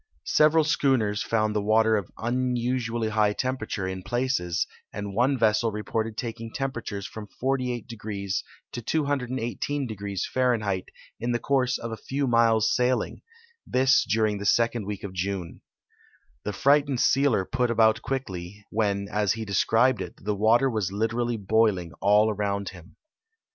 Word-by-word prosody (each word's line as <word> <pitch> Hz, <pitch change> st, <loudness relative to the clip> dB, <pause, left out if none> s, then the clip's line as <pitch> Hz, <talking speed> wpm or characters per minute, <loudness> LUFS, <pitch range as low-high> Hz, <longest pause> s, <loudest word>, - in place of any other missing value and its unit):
Several 155 Hz, +1 st, +4 dB
schooners 125 Hz, -8 st, +1 dB
found 110 Hz, -1 st, 0 dB
the 105 Hz, -, +1 dB
water 110 Hz, +1 st, +3 dB
of 100 Hz, -4 st, -2 dB
unusually 120 Hz, -1 st, -1 dB
high 105 Hz, -1 st, +2 dB
tempera 130 Hz, -1 st, -2 dB
ture 95 Hz, -2 st, -3 dB
in 95 Hz, 0 st, -4 dB
places, 120 Hz, -8 st, -1 dB, 0.3 s
and 100 Hz, -1 st, -5 dB
one 130 Hz, +6 st, +2 dB
ves.sel 110 Hz, 0 st, +2 dB
rei>orted 110 Hz, +1 st, -3 dB
taking 115 Hz, -1 st, -5 dB
temperatures 120 Hz, -7 st, -4 dB
from 105 Hz, 0 st, -8 dB
48° 125 Hz, -3 st, -1 dB, 0.8 s
to 120 Hz, -, -5 dB
218° 125 Hz, -, -2 dB
Fahrenlieit 110 Hz, -7 st, +1 dB, 0.3 s
in 120 Hz, +2 st, -1 dB
the -, -, +2 dB
course 130 Hz, 0 st, +1 dB
of 115 Hz, -, -6 dB
a 110 Hz, -, -4 dB
few 140 Hz, +4 st, -2 dB
miles' 115 Hz, -3 st, +3 dB
sailing, 125 Hz, 0 st, 0 dB, 0.5 s
this 130 Hz, +1 st, +4 dB
during 110 Hz, -1 st, +1 dB
the 100 Hz, -, -5 dB
second 115 Hz, -2 st, +2 dB
week 105 Hz, -1 st, -5 dB
of 100 Hz, -2 st, -6 dB
June, 95 Hz, -2 st, -4 dB, 0.8 s
ddie 105 Hz, -, -3 dB
frightened 140 Hz, 0 st, +3 dB
sealer 130 Hz, -10 st, +3 dB
|)ut 125 Hz, -2 st, +2 dB
about 110 Hz, -1 st, +3 dB
quickly, 100 Hz, -7 st, -5 dB
when, 100 Hz, -2 st, 0 dB
as 105 Hz, -2 st, +1 dB
he 110 Hz, 0 st, -5 dB
descril^ed 115 Hz, +6 st, +2 dB
it, -, -, -6 dB
the 105 Hz, -, +1 dB
water 115 Hz, +6 st, +4 dB
was 110 Hz, -7 st, -1 dB
literally 115 Hz, +3 st, -1 dB
boiling 100 Hz, -4 st, +1 dB
all 105 Hz, +2 st, +4 dB
around 100 Hz, -1 st, -2 dB
him. 90 Hz, 0 st, -14 dB
110 Hz, 145 wpm, -26 LUFS, 105-125 Hz, 0.8 s, Several